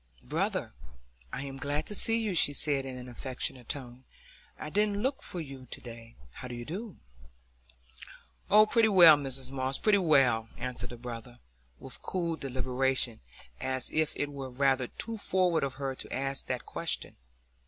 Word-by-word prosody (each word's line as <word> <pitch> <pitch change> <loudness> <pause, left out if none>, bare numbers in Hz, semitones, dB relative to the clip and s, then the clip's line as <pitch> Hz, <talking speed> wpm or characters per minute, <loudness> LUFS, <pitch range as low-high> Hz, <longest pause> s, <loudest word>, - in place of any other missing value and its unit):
"Brother, - - -2 0.6
I'm 135 +1 -5
glad 145 +3 -2
to - - -5
see 225 +2 +4
you," 220 -4 -1
she 150 -4 +6
said, 140 -2 +1
in 130 -1 -6
an 125 0 -9
affectionate 125 0 -3
tone. 130 -2 -5 0.5
"I 150 - -7
didn't 205 +1 +1
look 265 +1 -1
for 180 - -5
you 135 -5 -8
to - - -7
day. 115 -1 -11 0.2
How 125 - -9
do 125 - -6
you 120 0 -7
do?" 200 - -6 1.5
"Oh, 210 +2 +8
pretty 225 0 +3
well, 175 -6 +9
Mrs 135 -2 -3
Moss, 130 0 0
pretty 210 -2 +3
well," 130 -10 +4
answered 125 +1 -4
the 120 - -8
brother, 120 0 -8 0.4
with - - -10
cool 170 -3 -2
deliberation, 130 -3 -1 0.4
as 130 0 -1
if 155 -1 +1
it 145 - -2
were 135 -2 -6
rather 130 0 +1
too 225 - -4
forward 180 -5 +1
of 135 -1 -2
her 135 -1 -3
to - - -8
ask 135 +1 -1
that - - -3
question. - - -1
135 Hz, 165 wpm, -30 LUFS, 125-170 Hz, 1.5 s, well